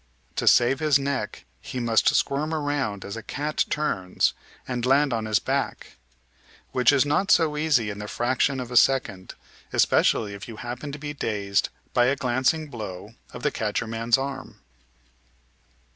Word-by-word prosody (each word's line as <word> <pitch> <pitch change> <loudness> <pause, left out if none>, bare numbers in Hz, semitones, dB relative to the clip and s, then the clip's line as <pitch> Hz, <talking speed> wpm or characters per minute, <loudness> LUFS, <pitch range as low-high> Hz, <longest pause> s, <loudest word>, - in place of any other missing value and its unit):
To - - -1
save 125 +3 +5
his 155 -3 +4
neck 140 -6 -3
he 130 - -6
must 115 -2 +3
squirm 150 +3 0
around, 145 -9 -2
as 100 - -6
a 115 - -6
cat 150 +7 -2
turns, 95 -12 0 0.3
and 125 -2 -3
land 135 +1 +3
on 110 -1 -2
his 110 -1 +2
back; - - -3 0.7
which 125 -1 +4
is 140 -1 +3
not 150 +7 +1
so 160 -3 +4
easy 145 -8 +1
in 100 - -8
the 105 - -6
fraction 130 +4 0
of 125 -1 -6
a 125 - +2
second, 100 -9 +2 0.4
especially 105 -3 +2
if 100 0 -9
you 115 - -8
happen 125 +5 -6
to 140 - -6
be 145 0 -6
dazed 100 -7 -1 0.2
by 120 - +4
a 130 +3 +2
glancing 130 +5 0
blow 105 -9 -8 0.2
of - - -9
the - - +1
catcher - - -2
man's 115 +1 +1
arm. 135 -6 -6
125 Hz, 165 wpm, -25 LUFS, 110-140 Hz, 0.7 s, save